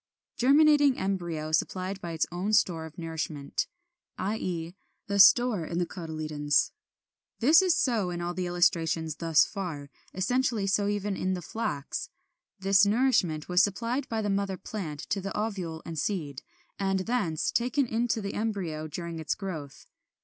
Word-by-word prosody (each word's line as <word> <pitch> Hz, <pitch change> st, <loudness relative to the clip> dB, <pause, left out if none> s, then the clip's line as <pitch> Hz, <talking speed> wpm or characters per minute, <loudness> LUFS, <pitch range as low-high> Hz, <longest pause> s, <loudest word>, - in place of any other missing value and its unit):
30. 245 Hz, -, +1 dB
=Germinating 290 Hz, -3 st, +5 dB
Embryo 170 Hz, -5 st, -2 dB
supplied 185 Hz, +4 st, -1 dB
by 170 Hz, -, -5 dB
its 160 Hz, -1 st, 0 dB
own 185 Hz, +5 st, -2 dB
Store 165 Hz, -6 st, +2 dB
of 155 Hz, -, -16 dB
Nourishment=, 160 Hz, -4 st, -3 dB, 0.5 s
i. 200 Hz, +4 st, -1 dB
e. 170 Hz, -3 st, -4 dB, 0.3 s
the 200 Hz, 0 st, -1 dB
store 220 Hz, -1 st, +6 dB
in 170 Hz, +2 st, -4 dB
the 175 Hz, -, +1 dB
cotyledons. 155 Hz, -4 st, -1 dB, 0.7 s
This 305 Hz, +9 st, +6 dB
is 365 Hz, -3 st, +3 dB
so 225 Hz, -11 st, +1 dB
in 175 Hz, -1 st, -4 dB
all 175 Hz, 0 st, -3 dB
the 180 Hz, 0 st, -2 dB
illustrations 165 Hz, -3 st, +1 dB
thus 165 Hz, -2 st, +4 dB
far, 160 Hz, -9 st, -6 dB, 0.2 s
essentially 225 Hz, +2 st, 0 dB
so 200 Hz, +1 st, +1 dB
even 205 Hz, -1 st, -1 dB
in 185 Hz, 0 st, -1 dB
the 180 Hz, -, -5 dB
Flax. 155 Hz, -11 st, -4 dB, 0.5 s
This 195 Hz, 0 st, +4 dB
nourishment 205 Hz, -, +2 dB
was 180 Hz, 0 st, +4 dB
supplied 230 Hz, +7 st, -1 dB
by 225 Hz, -1 st, -1 dB
the 205 Hz, -, -1 dB
mother 195 Hz, -1 st, -1 dB
plant 165 Hz, -8 st, -6 dB
to 200 Hz, -, 0 dB
the 195 Hz, +1 st, -4 dB
ovule 185 Hz, -7 st, -3 dB
and 165 Hz, -2 st, -4 dB
seed, 150 Hz, -8 st, -2 dB, 0.4 s
and 195 Hz, -1 st, +1 dB
thence 190 Hz, -8 st, -1 dB
taken 255 Hz, +4 st, +1 dB
into 230 Hz, -1 st, 0 dB
the 200 Hz, -1 st, -4 dB
embryo 185 Hz, -8 st, -3 dB
during 170 Hz, +1 st, -6 dB
its 160 Hz, -, -1 dB
growth. 160 Hz, -9 st, -7 dB
185 Hz, 160 wpm, -28 LUFS, 165-215 Hz, 0.7 s, store